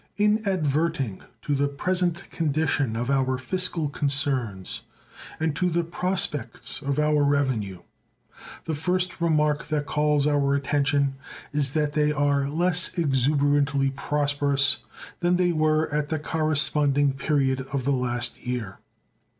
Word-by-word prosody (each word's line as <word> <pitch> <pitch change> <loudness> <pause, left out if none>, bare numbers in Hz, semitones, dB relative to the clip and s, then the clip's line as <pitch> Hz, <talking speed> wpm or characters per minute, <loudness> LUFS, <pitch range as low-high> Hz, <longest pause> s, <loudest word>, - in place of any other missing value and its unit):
In 210 +1 +3
adverting 155 - -1 0.2
to 145 - -1
the 140 0 +1
present 175 +5 -1
condition 145 -6 0
of 120 +4 -2
our 130 -1 +1
fiscal 165 +3 0
concerns 135 - -1 0.6
and 160 -2 0
to 180 - +1
the 170 0 0
prospects 170 -7 -2
of 140 -1 -2
our 150 -1 +2
revenue 130 -10 0 0.8
the 160 - -2
first 180 +4 -1
remark 150 -3 +1
that 150 -1 -1
calls 150 -1 +1
our 140 -2 +2
attention 140 -1 +1 0.3
is 145 -2 -1
that 150 -2 0
they 150 0 +2
are 140 -1 +1
less 175 +3 +1
exuberantly 140 -1 +2
prosperous 140 -1 +1 0.4
than 175 +1 +2
they 180 -1 +2
were 155 -1 +2
at 150 -1 -1
the 160 - 0
corresponding 150 -2 +2
period 135 -1 0
of 135 -3 -2
the 140 - +2
last 120 -2 -1
year. 120 -6 -4
145 Hz, 130 wpm, -25 LUFS, 135-155 Hz, 0.8 s, In